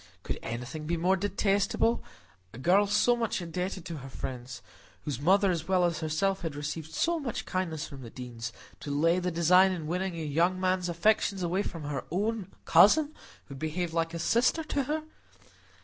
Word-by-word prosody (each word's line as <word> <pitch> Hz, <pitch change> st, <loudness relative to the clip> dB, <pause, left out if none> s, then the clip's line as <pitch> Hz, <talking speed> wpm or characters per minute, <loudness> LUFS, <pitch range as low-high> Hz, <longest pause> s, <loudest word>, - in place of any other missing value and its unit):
Could -, -, -4 dB
anything 125 Hz, +7 st, -5 dB
be 170 Hz, +1 st, 0 dB
more 180 Hz, +3 st, +3 dB
detestable? 200 Hz, +3 st, +1 dB, 0.5 s
A -, -, -9 dB
girl 185 Hz, +9 st, +4 dB
so 210 Hz, +4 st, +3 dB
much 230 Hz, -3 st, -1 dB
indebted 180 Hz, +1 st, -4 dB
to 170 Hz, -3 st, -5 dB
her 135 Hz, -1 st, -9 dB
friends—whose 120 Hz, -2 st, -7 dB
mother 190 Hz, +5 st, +4 dB
as 165 Hz, -2 st, -3 dB
well 185 Hz, -2 st, +3 dB
as 170 Hz, -2 st, 0 dB
herself 175 Hz, +5 st, 0 dB
had 165 Hz, -4 st, -4 dB
received 150 Hz, +2 st, -5 dB
so 340 Hz, 0 st, +1 dB
much 255 Hz, -7 st, -4 dB
kindness 170 Hz, -5 st, -2 dB
from 140 Hz, -3 st, -10 dB
the 120 Hz, -, -8 dB
Deanes—to 120 Hz, +3 st, -8 dB
lay 165 Hz, +5 st, +2 dB
the 180 Hz, 0 st, -1 dB
design 180 Hz, +3 st, +5 dB
of 165 Hz, -3 st, -6 dB
winning 180 Hz, +3 st, -2 dB
a 165 Hz, -, -4 dB
young 170 Hz, +5 st, +1 dB
man's 185 Hz, -1 st, +1 dB
affections 195 Hz, +2 st, +2 dB
away 175 Hz, +3 st, +1 dB
from 165 Hz, -6 st, -5 dB
her 145 Hz, -2 st, -3 dB
own 210 Hz, +3 st, -2 dB
cousin, 285 Hz, -, +6 dB, 0.3 s
who 140 Hz, -, -10 dB
had 135 Hz, -, -9 dB
behaved 160 Hz, +2 st, -2 dB
like 165 Hz, 0 st, -1 dB
a -, -, -2 dB
sister 240 Hz, -, +2 dB
to 285 Hz, -3 st, -1 dB
her! 305 Hz, +3 st, -2 dB
175 Hz, 180 wpm, -29 LUFS, 155-195 Hz, 0.5 s, cousin